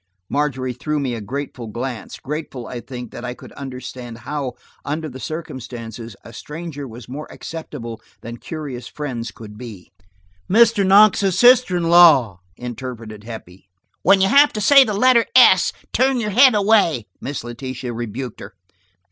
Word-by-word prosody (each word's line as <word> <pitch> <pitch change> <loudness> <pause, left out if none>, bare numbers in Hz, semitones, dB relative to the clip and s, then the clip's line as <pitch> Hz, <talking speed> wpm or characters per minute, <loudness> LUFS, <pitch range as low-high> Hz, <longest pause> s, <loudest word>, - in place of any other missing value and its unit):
Margery 135 -3 -1
threw 150 +4 -3
me 135 -3 -2
a 115 - -5
grateful 125 +1 -6
glance, 120 +2 -6
grateful, 145 -4 -6
I 125 - -6
think, 125 -1 -8
that - - -9
I 125 0 -5
could - - -13
understand 125 -3 -8
how, 135 +1 -4 0.3
under 155 +2 -3
the 130 -2 -9
circumstances, 120 -7 -7
a 115 - -13
stranger 150 +1 -7
was 115 0 -11
more 145 +4 -8
acceptable 120 -8 -8 0.2
than 115 +1 -8
curious 140 -4 -7
friends 125 -6 -5
could 105 -1 -12
be. 110 -7 -10 0.6
"Mr. 225 0 +5
Knox's 195 -1 +5
sister 245 -5 +5
in 175 - -1
law!" 160 - +6 0.2
interpreted 120 -3 -7
Heppie. 95 -5 -11 0.3
"When 195 -1 +5
you 190 - +4
have 285 +7 +6
to 215 - -3
say 270 +7 +7
the 215 -5 -2
letter 240 +1 +4
's,' 190 -7 +6 0.2
turn 260 +1 +2
your 210 -2 -2
head 250 +3 +6
away," 200 - +3 0.2
Miss 140 -1 -5
Letitia 125 +1 -6
rebuked 120 +1 -6
her. 100 0 -11
135 Hz, 155 wpm, -20 LUFS, 120-175 Hz, 0.6 s, say